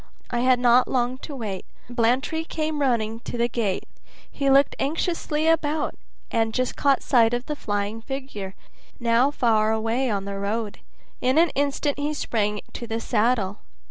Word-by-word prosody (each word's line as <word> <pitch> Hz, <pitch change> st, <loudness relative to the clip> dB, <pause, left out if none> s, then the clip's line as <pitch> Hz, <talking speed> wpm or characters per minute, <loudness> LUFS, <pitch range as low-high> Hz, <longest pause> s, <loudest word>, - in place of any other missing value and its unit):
I 240 Hz, -, 0 dB
had 255 Hz, +1 st, +4 dB
not 245 Hz, 0 st, +5 dB
long 255 Hz, 0 st, 0 dB
to 290 Hz, -, -7 dB
wait. 205 Hz, -7 st, -4 dB, 0.2 s
Blantyre 245 Hz, +7 st, +1 dB
came 310 Hz, -2 st, -2 dB
running 225 Hz, -4 st, +1 dB
to 240 Hz, -, -6 dB
the 235 Hz, 0 st, +2 dB
gate; 220 Hz, -5 st, -2 dB, 0.4 s
he 275 Hz, -1 st, 0 dB
looked 275 Hz, +1 st, +5 dB
anxiously 315 Hz, 0 st, -1 dB
about, 315 Hz, -1 st, +1 dB, 0.4 s
and 225 Hz, -1 st, +1 dB
just 255 Hz, -1 st, 0 dB
caught 280 Hz, -2 st, +2 dB
sight 235 Hz, -2 st, +4 dB
of 245 Hz, +1 st, -4 dB
the 300 Hz, -, -3 dB
flying 205 Hz, -2 st, -2 dB
figure, 240 Hz, -7 st, -6 dB, 0.4 s
now 235 Hz, +3 st, +3 dB
far 220 Hz, -6 st, +2 dB
away 225 Hz, +4 st, 0 dB
on 200 Hz, -2 st, -1 dB
the 200 Hz, 0 st, -4 dB
road. 210 Hz, +1 st, -2 dB, 0.4 s
In 255 Hz, +3 st, +2 dB
an 330 Hz, -1 st, +5 dB
instant 285 Hz, +1 st, 0 dB
he 295 Hz, +1 st, -1 dB
sprang 210 Hz, -6 st, -1 dB
to 235 Hz, -, -6 dB
the 225 Hz, 0 st, -2 dB
saddle. 220 Hz, -3 st, +1 dB
245 Hz, 165 wpm, -24 LUFS, 220-275 Hz, 0.4 s, not